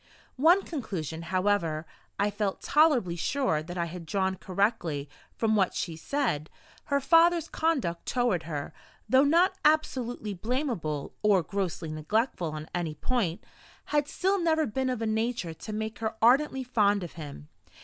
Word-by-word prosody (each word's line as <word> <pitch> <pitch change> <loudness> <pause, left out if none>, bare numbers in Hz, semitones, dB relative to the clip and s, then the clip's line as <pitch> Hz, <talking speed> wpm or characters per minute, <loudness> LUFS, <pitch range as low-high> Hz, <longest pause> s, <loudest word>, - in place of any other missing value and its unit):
One 340 +8 +5
conclusion, 170 - -4
however, 185 -4 +1 0.3
I 205 +1 +1
felt 205 -2 -2
tolerably 285 - +3
sure 175 - 0
that 175 +3 -7
I 170 - 0
had 170 0 -8
drawn 190 +2 0
correctly 185 -7 -1 0.3
from 220 -1 +2
what 195 -3 +2
she 165 -3 -3
said: 165 - -1 0.4
her 280 -1 +1
father's 330 +3 +4
conduct 275 - -1
toward 245 -9 +1
her, 145 -3 -4 0.3
though 260 +4 +5
not 335 +6 +4
absolutely 255 -8 +1
blamable 215 - -2
or 200 -4 +4
grossly 175 -3 -3
neglectful 175 - -1
on 155 0 -6
any 170 -3 -2
point, 200 -8 -1 0.5
had 295 -1 +2
still 385 +5 0
never 320 -2 +2
been 260 +3 -1
of 245 -3 -2
a - - 0
nature 220 -5 -1
to 210 +7 -8
make 220 +1 -4
her 220 -1 -2
ardently 265 +3 +4
fond 205 -5 +2
of 170 - -6
him. 150 -2 -9
210 Hz, 150 wpm, -28 LUFS, 170-265 Hz, 0.5 s, One